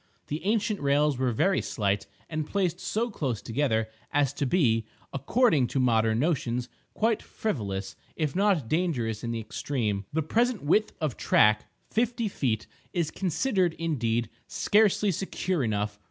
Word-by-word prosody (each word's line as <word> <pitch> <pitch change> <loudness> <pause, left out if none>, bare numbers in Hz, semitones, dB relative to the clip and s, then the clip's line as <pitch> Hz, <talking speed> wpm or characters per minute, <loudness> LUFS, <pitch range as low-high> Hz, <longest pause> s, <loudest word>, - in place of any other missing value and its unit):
The 150 +2 -3
ancient 210 -1 +1
rails 140 -1 +2
were 130 -1 +2
very 190 - +2
slight, 100 -2 -1 0.2
and 155 -1 -3
placed 180 -3 0
so 230 +5 -1
close 130 - -2
together 115 -3 0 0.2
as 145 -2 +2
to 140 - -1
be, 120 -8 +3 0.3
according 145 - +3
to 135 - -1
modern 115 -3 +3
notions, 125 -4 0 0.3
quite 225 0 +1
frivolous, 100 - -3 0.2
if 150 -4 -1
not 190 - +2
dangerous 125 - 0
in 120 - -2
the 115 -1 -2
extreme. 110 -3 -2
The 160 +1 0
present 235 - +1
width 210 +9 +2
of 155 -7 -2
track—fifty 220 - +1
feet—is 150 - -3
considered, 185 - 0
indeed, 120 -8 -1 0.2
scarcely 210 -1 +3
secure 185 -2 -1
enough. 105 -2 -1
145 Hz, 140 wpm, -28 LUFS, 115-190 Hz, 0.3 s, be